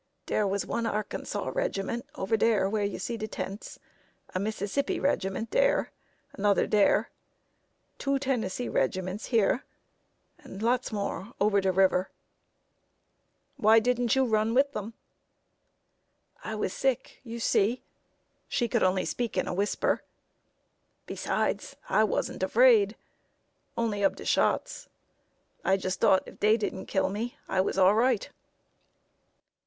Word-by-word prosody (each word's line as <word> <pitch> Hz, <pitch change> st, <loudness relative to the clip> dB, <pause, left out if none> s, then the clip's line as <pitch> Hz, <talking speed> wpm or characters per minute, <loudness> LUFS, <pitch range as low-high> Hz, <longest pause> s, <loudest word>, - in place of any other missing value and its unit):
"Dere 210 Hz, -, +1 dB
was 195 Hz, +1 st, -1 dB
one 230 Hz, 0 st, -2 dB
Arkansas 210 Hz, -1 st, -3 dB
regiment 240 Hz, -, -2 dB
over 195 Hz, +4 st, 0 dB
dere 215 Hz, -3 st, +2 dB
where 210 Hz, +1 st, -1 dB
you 200 Hz, -, -2 dB
see 235 Hz, -, -4 dB
de 215 Hz, 0 st, -4 dB
tents, 200 Hz, 0 st, -6 dB, 0.6 s
a 185 Hz, -, -1 dB
Mississippi 215 Hz, +6 st, -2 dB
regiment 220 Hz, -4 st, -1 dB
dere, -, -, +2 dB, 0.4 s
another 200 Hz, 0 st, +2 dB
dere, 210 Hz, -2 st, +3 dB, 0.9 s
two 275 Hz, 0 st, +1 dB
Tennessee 250 Hz, -4 st, -2 dB
regiments 185 Hz, +8 st, -1 dB
here, 230 Hz, +3 st, +2 dB, 0.8 s
and 195 Hz, +3 st, -9 dB
lots 245 Hz, +2 st, +1 dB
more 205 Hz, +1 st, -4 dB
over 200 Hz, 0 st, +3 dB
de 190 Hz, 0 st, +2 dB
river." 185 Hz, 0 st, +2 dB, 1.5 s
"Why 220 Hz, +1 st, +5 dB
didn't 245 Hz, +1 st, +1 dB
you 265 Hz, 0 st, +3 dB
run 220 Hz, 0 st, +1 dB
with 280 Hz, +2 st, +4 dB
them?" 220 Hz, -2 st, -6 dB, 1.5 s
"I 220 Hz, -, -4 dB
was 210 Hz, -3 st, -2 dB
sick, 265 Hz, -1 st, -1 dB
you 235 Hz, -1 st, -7 dB
see" 225 Hz, +2 st, +1 dB, 0.6 s
(she 240 Hz, -, 0 dB
could -, -, 0 dB
only 185 Hz, 0 st, +2 dB
speak 240 Hz, -3 st, -3 dB
in -, -, 0 dB
a -, -, -2 dB
whisper); 200 Hz, +3 st, 0 dB, 1.0 s
"besides, -, -, -2 dB
I -, -, +4 dB
wasn't -, -, -2 dB
afraid 485 Hz, -5 st, +5 dB, 0.8 s
only 215 Hz, -3 st, -1 dB
ob 195 Hz, -, +3 dB
de -, -, -10 dB
shots. -, -, 0 dB, 0.7 s
I 190 Hz, -, +3 dB
just 185 Hz, 0 st, -3 dB
thought 190 Hz, -, +4 dB
if -, -, -13 dB
dey 215 Hz, +2 st, +4 dB
didn't 205 Hz, -3 st, -4 dB
kill 190 Hz, -, +1 dB
me 225 Hz, +5 st, -4 dB
I 190 Hz, -, +1 dB
was 190 Hz, -, -2 dB
all 190 Hz, +1 st, +6 dB
right." 235 Hz, 0 st, +2 dB
215 Hz, 135 wpm, -28 LUFS, 195-240 Hz, 1.5 s, all